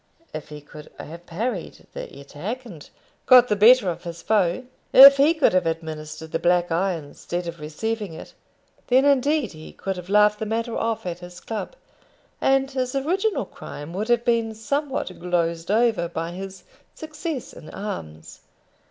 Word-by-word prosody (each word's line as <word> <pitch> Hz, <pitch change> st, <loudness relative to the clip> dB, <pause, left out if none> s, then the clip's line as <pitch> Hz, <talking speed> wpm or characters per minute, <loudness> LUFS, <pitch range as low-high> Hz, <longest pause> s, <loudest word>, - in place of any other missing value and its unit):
If 155 Hz, -, -7 dB
he 150 Hz, -1 st, -9 dB
could 150 Hz, +1 st, -13 dB
have 170 Hz, +3 st, -10 dB
parried 205 Hz, +1 st, -4 dB
the -, -, -6 dB
attack, 190 Hz, -, -6 dB
and 170 Hz, -10 st, -12 dB, 0.4 s
got 250 Hz, -1 st, +7 dB
the 210 Hz, -, +2 dB
better 225 Hz, +1 st, +6 dB
of 175 Hz, -, -3 dB
his 170 Hz, -1 st, -8 dB
foe; 200 Hz, 0 st, +1 dB, 0.3 s
if 275 Hz, +1 st, +10 dB
he 295 Hz, +4 st, +4 dB
could 310 Hz, -, +3 dB
have 185 Hz, -2 st, +2 dB
administered 160 Hz, -1 st, -5 dB
the -, -, -1 dB
black 175 Hz, 0 st, +2 dB
eye 185 Hz, +3 st, +1 dB
instead 170 Hz, +3 st, -6 dB
of 170 Hz, -1 st, -7 dB
receiving 205 Hz, +6 st, -4 dB
it, -, -, -11 dB, 0.5 s
then 260 Hz, +2 st, +4 dB
indeed 280 Hz, -2 st, +2 dB
he 155 Hz, -1 st, -11 dB
could 195 Hz, -1 st, -4 dB
have 180 Hz, +1 st, -9 dB
laughed 210 Hz, +1 st, +4 dB
the 220 Hz, -, -3 dB
matter 230 Hz, +2 st, -2 dB
off 225 Hz, -3 st, -2 dB
at 175 Hz, -1 st, -4 dB
his 175 Hz, 0 st, -11 dB
club, 225 Hz, -, -6 dB, 0.7 s
and 270 Hz, 0 st, +2 dB
his 255 Hz, -1 st, -2 dB
original 370 Hz, +10 st, 0 dB
crime 145 Hz, +3 st, -9 dB
would 205 Hz, +4 st, -3 dB
have 240 Hz, 0 st, +2 dB
been 230 Hz, -2 st, +1 dB
somewhat 280 Hz, +4 st, -2 dB
glozed 170 Hz, -1 st, -1 dB
over 220 Hz, -4 st, +2 dB
by 165 Hz, 0 st, -4 dB
his 190 Hz, +1 st, -8 dB, 0.3 s
success 310 Hz, -3 st, -6 dB
in 155 Hz, -, -12 dB
arms. 80 Hz, -, -7 dB
200 Hz, 170 wpm, -23 LUFS, 170-250 Hz, 0.7 s, if